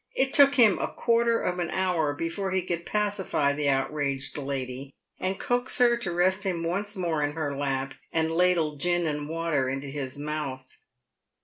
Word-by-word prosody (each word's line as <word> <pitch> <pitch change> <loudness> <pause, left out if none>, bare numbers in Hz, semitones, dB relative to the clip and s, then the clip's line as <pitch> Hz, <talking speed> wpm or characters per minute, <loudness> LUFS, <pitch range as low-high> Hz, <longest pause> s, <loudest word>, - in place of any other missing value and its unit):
It 265 0 +2
took 280 -1 +7
him 225 -7 +5
a - - 0
quarter 235 0 +1
of 180 0 -1
an 175 - -1
hour 180 -5 0
before 165 +5 -3
he 185 -1 0
could 170 -1 -4
pacify 205 -9 0
the 145 0 0
outraged 135 0 -1
lady 135 -1 -5 0.2
and 190 +1 -2
coax 245 +1 +1
her 240 -1 +5
to 210 -7 -3
rest 185 +3 +2
him 180 -4 -1
once 200 +5 -2
more 170 -5 -1
in 145 0 0
her 150 -3 -3
lap, 135 -1 -2 0.2
and 160 0 0
ladle 165 -3 +2
gin 175 +3 +1
and 150 -1 -3
water 165 -5 0
into 135 +2 -3
his 135 -1 -5
mouth. 145 -3 -5
165 Hz, 180 wpm, -27 LUFS, 145-190 Hz, 0.2 s, took